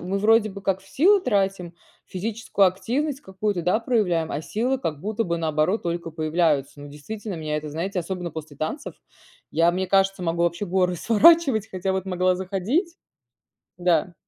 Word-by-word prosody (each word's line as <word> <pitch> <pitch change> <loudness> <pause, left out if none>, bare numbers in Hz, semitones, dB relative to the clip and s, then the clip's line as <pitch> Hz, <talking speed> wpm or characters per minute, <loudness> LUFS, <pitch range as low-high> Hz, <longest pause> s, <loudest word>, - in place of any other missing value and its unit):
мы 185 +3 -2
вроде 215 +1 +4
бы 200 +1 -9
как 195 -1 -1
в 190 - -20
силы 385 - +4
тратим, 195 - -1 0.3
физическую 205 +1 0
активность 265 +10 -1
какую-то, 190 -1 -2
да, 180 +6 +2
проявляем, 195 -10 0
а 150 - -3
силы, 245 +9 -1
как 155 - -4
будто 215 +4 -2
бы 170 -1 -2
наоборот 160 +5 0
только 170 -1 -3
появляются. 155 -3 0
Но 145 - -9
действительно 195 +8 -7
меня 155 -1 -3
это 150 0 -5
знаете 180 +5 -2
особенно 175 0 -5
после 155 -2 -9
танцев, 160 - -4 0.6
я, 165 +1 +3
мне 185 +1 -1
кажется, 195 0 +2
могу 170 0 0
вообще 170 +4 0
горы 180 0 +1
сворачивать, 230 - +4
хотя 190 +1 -2
вот 190 -1 -2
могла 185 -1 +1
заходить 205 - -1 0.8
Да. 175 -1 +1
185 Hz, 170 wpm, -24 LUFS, 170-215 Hz, 0.8 s, вроде